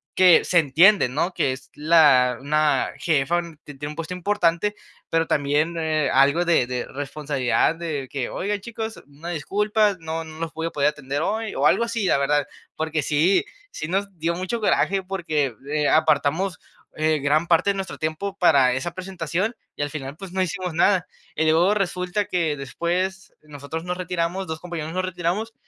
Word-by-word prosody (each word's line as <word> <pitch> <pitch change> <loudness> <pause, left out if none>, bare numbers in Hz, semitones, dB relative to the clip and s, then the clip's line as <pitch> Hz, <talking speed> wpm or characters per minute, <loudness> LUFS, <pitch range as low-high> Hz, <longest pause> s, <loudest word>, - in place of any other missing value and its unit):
que, 185 -2 +6
se 180 - +1
entiende, 170 +5 +5
¿no?, 155 +8 -1
que 140 -6 0
es 135 +1 -11
la 145 -6 +4
una 150 -1 +1
jefa, 160 +1 +1 0.2
que 145 - -10
tiene 145 +2 -6
un - - -9
puesto 165 +2 -5
importante, 190 +1 +1 0.3
pero 165 0 +1
también, 150 +3 +1
eh, 155 -2 0
algo 140 +6 +4
de 170 -7 +3
de 125 -1 -3
responsabilidad 145 0 -1
de 155 -5 -4
que: 135 -3 -2
"Oigan, 205 +2 -2
chicos, 225 +1 -6
una 145 +4 -9
disculpa, 205 +6 +1
no 160 0 -4
no 160 0 -11
los 165 -1 -3
voy 165 0 -3
a - - -5
poder 145 0 +2
atender 145 -1 -4
hoy", 215 +5 -2
o - - +1
algo - - +4
así, 230 -3 -2
la 180 - +3
verdad. 145 +1 +1 0.3
Porque 160 -1 -1
sí, 155 - +2 0.3
sí 155 - -5
nos 195 +4 0
dio 165 +1 -1
mucho 185 +6 -3
coraje 195 -2 +1
porque, 155 -8 -1 0.2
eh, 150 -1 +1
apartamos, 160 +3 +2 0.4
eh, 155 0 +1
gran 150 +4 +1
parte 170 +4 +3
de - - -4
nuestro 195 -1 -5
tiempo 175 +6 -3
para 140 -8 +4
esa 135 +7 -3
presentación, 185 +3 -3 0.2
y - - -4
al 145 - -2
final, 145 -1 -7
pues 195 0 -9
no 190 - 0
hicimos 185 -1 -2
nada. 180 +2 +3 0.3
Y - - +1
luego 165 +5 +4
resulta 185 +1 -1
que 165 -6 -1
después, 180 +7 -3
nosotros 150 +2 -7
nos 180 0 -3
retiramos, 180 +1 -2
2 160 0 -4
compañeros 165 -2 -5
nos 185 0 -1
retiramos 185 +5 -2
165 Hz, 180 wpm, -23 LUFS, 150-185 Hz, 0.4 s, que